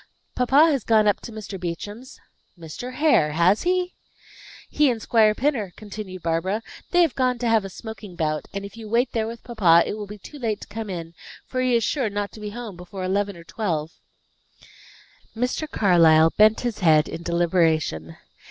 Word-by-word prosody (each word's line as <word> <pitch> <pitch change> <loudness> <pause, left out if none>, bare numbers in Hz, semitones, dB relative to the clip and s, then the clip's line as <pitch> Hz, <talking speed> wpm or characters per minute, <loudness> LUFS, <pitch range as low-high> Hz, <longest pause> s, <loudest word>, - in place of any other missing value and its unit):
"Papa 280 +6 +4
has 275 -6 -1
gone 215 -2 +3
up 205 - +2
to 235 - -9
Mr. 215 -3 -7
Beauchamp's." 205 +8 -7 0.4
"Mr. 170 +10 -8
Hare! 270 - +3
Has 175 +6 +3
he?" 360 0 0 0.7
"He 295 -2 +2
and 235 -2 -1
Squire 215 -1 +3
Pinner," 240 - -1
continued 200 -3 -8
Barbara. 175 +6 -1 0.3
"They 355 -1 +4
have 325 - +1
gone 255 -2 +1
to 240 0 -2
have 225 -2 +3
a 195 - -6
smoking 215 -2 -9
bout. 155 -2 -2
And 200 0 -5
if 200 - -10
you 225 -2 -9
wait 240 +4 +1
there 220 -1 -1
with 230 +1 -8
papa, 180 -9 +4
it - - -3
will 210 -1 -6
be 210 +1 -9
too 290 +9 -12
late 220 -4 -2
to - - -9
come 220 0 -6
in, 170 -3 -6 0.3
for 255 - -3
he 255 -1 +2
is 230 - +2
sure 250 0 0
not 205 0 -3
to - - -12
be 210 0 -5
home 225 -2 -7
before 180 +2 -8
eleven 200 +1 -1
or 170 - -12
twelve." 165 -5 -3 1.5
Mr. 250 +6 -2
Carlyle 165 - +5
bent 215 +1 +5
his 240 -3 -3
head 155 -5 +4
in 165 - -6
deliberation. 165 - 0
210 Hz, 190 wpm, -23 LUFS, 175-235 Hz, 1.5 s, Carlyle